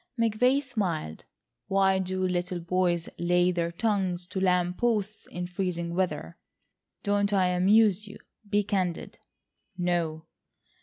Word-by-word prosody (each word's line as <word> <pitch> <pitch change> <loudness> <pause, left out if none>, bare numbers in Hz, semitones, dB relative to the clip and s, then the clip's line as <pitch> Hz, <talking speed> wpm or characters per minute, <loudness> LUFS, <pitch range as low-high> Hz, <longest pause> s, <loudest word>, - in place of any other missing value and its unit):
McVay 250 +5 +3
smiled. 180 - -3 0.4
"Why 195 -1 +3
do 185 0 -1
little 180 0 -2
boys 175 0 0
lay 175 +1 +3
their 170 -1 -1
tongues 185 -2 -1
to 190 - -3
lamp 180 -1 +1
posts 215 -3 -1
in 180 0 -5
freezing 175 -2 -3
weather? 175 - -2 0.6
Don't 205 0 +1
I 190 -3 +3
amuse 205 +3 +4
you? 205 - -10 0.3
Be 205 0 +2
candid." 185 -4 -2 0.6
"No." 170 -3 -1
185 Hz, 120 wpm, -28 LUFS, 175-205 Hz, 0.6 s, amuse